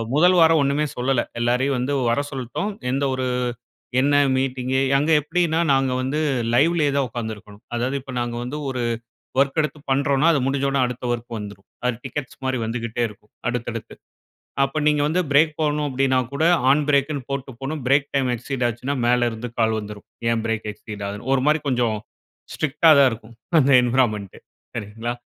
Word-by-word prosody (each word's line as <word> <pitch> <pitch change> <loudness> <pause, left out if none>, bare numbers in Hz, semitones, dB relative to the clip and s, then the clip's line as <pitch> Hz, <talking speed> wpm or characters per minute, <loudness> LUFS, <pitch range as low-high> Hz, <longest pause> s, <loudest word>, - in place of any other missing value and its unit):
முதல் 180 +3 +5
வாரம் 160 -2 +5
ஒண்ணுமே 145 +2 +1
சொல்லல. 125 0 +1 0.2
எல்லாரயும் 125 +3 +1
வந்து 140 +3 -1 0.2
வர 120 - +1
சொல்ட்டோம். 135 - -3 0.2
எந்த 135 +2 0
ஒரு, 130 -1 -2 0.7
என்ன 145 +1 +3 0.2
மீட்டிங், 130 -1 -2 0.3
அங்க 150 +4 +1
எப்பிடீன்னா 165 +1 0
நாங்க 135 -1 +2
வந்து 135 +4 -1 0.4
லைவ்‌லயே 150 +2 +3
தான் 140 - +2
ஒக்காந்து 110 -1 -4
இருக்கணும். 105 0 -15
அதாவது 125 +4 -1
இப்போ 135 -1 -9
நாங்க 120 0 -3
வந்து 130 +5 -5
ஒரு 130 -2 -3 0.6
வொர்க் 140 +3 +2
எடுத்து 150 0 -4
பண்றோம்னா, 140 +3 +3
அது 140 - +2
முடிஞ்சொன்னே 135 0 0
அடுத்த 125 0 -6
வொர்க் 120 -1 -5
வந்துரும். 100 -1 -9 0.2
அது 125 -2 +1
டிக்கெட்ஸ் 135 0 -5
மாரி 130 -2 0
வந்துகிட்டே 115 +1 -2
இருக்கும் 105 0 -18 0.2
அடுத்தடுத்து. 120 -2 -5 0.7
அப்போ, 135 +3 -2
நீங்க 150 -1 +3
வந்து 180 +4 +1
ஃப்ரேக் 155 +2 +4
போகணும் 150 -1 0
அப்டீன்னா 130 0 +2
கூட 140 - -1 0.3
ஆன் 150 +1 +3
ஃப்ரேக்குன்னு 140 -2 +1
போட்டு 135 -1 -4
போணும். 145 +2 -4
ஃப்ரேக் 140 +2 +3
டைம் 130 -2 +2
எக்சீட் 125 +1 -3
ஆச்சுன்னா 125 +4 -3
மேல 120 0 +3
இருந்து 115 +2 -6
கால் 110 -1 +2
வந்துரும். 105 -1 -9 0.2
"ஏன் 115 -1 0
ஃப்ரேக் 110 -1 -2
எக்சீட் 105 -1 -8
ஆகுது?", 105 +1 -6
ஒரு 130 - +2
மாரி 155 0 +3
கொஞ்சம் 120 -3 +1 0.6
ஸ்ட்ரிக்ட்‌டா 155 +2 +3
தான் 135 -2 +6
இருக்கும். 115 +1 -9 0.2
அந்த 140 0 +4
என்வ்ரான்மென்ட். 115 -6 0 0.4
சரீங்களா? 115 +3 -4
130 Hz, 170 wpm, -22 LUFS, 120-145 Hz, 0.7 s, தான்